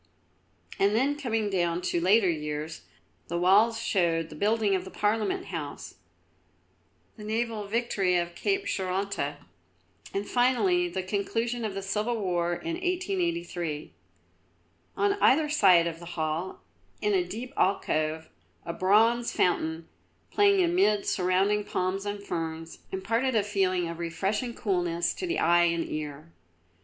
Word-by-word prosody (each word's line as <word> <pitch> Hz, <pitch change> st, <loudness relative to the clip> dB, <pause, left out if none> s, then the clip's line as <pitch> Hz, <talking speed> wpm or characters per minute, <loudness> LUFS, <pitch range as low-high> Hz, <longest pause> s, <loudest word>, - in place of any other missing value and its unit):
And 200 Hz, +2 st, +3 dB
then 270 Hz, +5 st, +2 dB
coming 225 Hz, -7 st, -1 dB
down 175 Hz, -2 st, 0 dB
to 170 Hz, -, 0 dB
later 195 Hz, +3 st, +4 dB
years, 150 Hz, -1 st, -3 dB, 0.5 s
the 170 Hz, -, -2 dB
walls 205 Hz, +6 st, +4 dB
showed 170 Hz, -7 st, 0 dB
the -, -, -10 dB
building 210 Hz, -1 st, +1 dB
of 185 Hz, -1 st, 0 dB
the 190 Hz, -, -9 dB
Parliament 210 Hz, +1 st, 0 dB
House: 150 Hz, -4 st, -6 dB, 1.2 s
the 210 Hz, -, -9 dB
naval 220 Hz, -1 st, -2 dB
victory 205 Hz, -4 st, 0 dB
of 175 Hz, 0 st, -2 dB
Cape 395 Hz, -, -1 dB
Cheronta, 185 Hz, -, -2 dB, 0.7 s
and 200 Hz, +1 st, -3 dB
finally 350 Hz, +9 st, +2 dB
the 190 Hz, -, -3 dB
conclusion 225 Hz, +5 st, -2 dB
of 210 Hz, -3 st, -3 dB
the 195 Hz, -, -4 dB
Civil 215 Hz, +4 st, -1 dB
War 175 Hz, -3 st, 0 dB
in 335 Hz, -, -4 dB
1883. 345 Hz, -, -2 dB, 1.0 s
On 405 Hz, 0 st, +3 dB
either 300 Hz, +3 st, +4 dB
side 190 Hz, -, +5 dB
of 165 Hz, -1 st, -4 dB
the 170 Hz, -, -10 dB
hall, 160 Hz, +3 st, -2 dB, 0.4 s
in 420 Hz, -, +1 dB
a 375 Hz, -2 st, +3 dB
deep 255 Hz, -4 st, -7 dB
alcove, 160 Hz, -4 st, 0 dB, 0.4 s
a 170 Hz, -, -4 dB
bronze 225 Hz, +6 st, +3 dB
fountain, 160 Hz, -2 st, 0 dB, 0.4 s
playing 400 Hz, -2 st, +4 dB
amid 335 Hz, -, +2 dB
surrounding 190 Hz, +3 st, +1 dB
palms 190 Hz, +1 st, -2 dB
and 205 Hz, 0 st, -4 dB
ferns, 165 Hz, -2 st, -5 dB
imparted 230 Hz, +7 st, 0 dB
a 215 Hz, -, +3 dB
feeling 185 Hz, -3 st, 0 dB
of 170 Hz, 0 st, -6 dB
refreshing 200 Hz, +8 st, -2 dB
coolness 175 Hz, -5 st, 0 dB
to 365 Hz, -, -5 dB
the 345 Hz, -, -1 dB
eye 175 Hz, +1 st, +4 dB
and 170 Hz, -1 st, 0 dB
ear. 155 Hz, +1 st, -6 dB
195 Hz, 140 wpm, -28 LUFS, 170-235 Hz, 1.2 s, side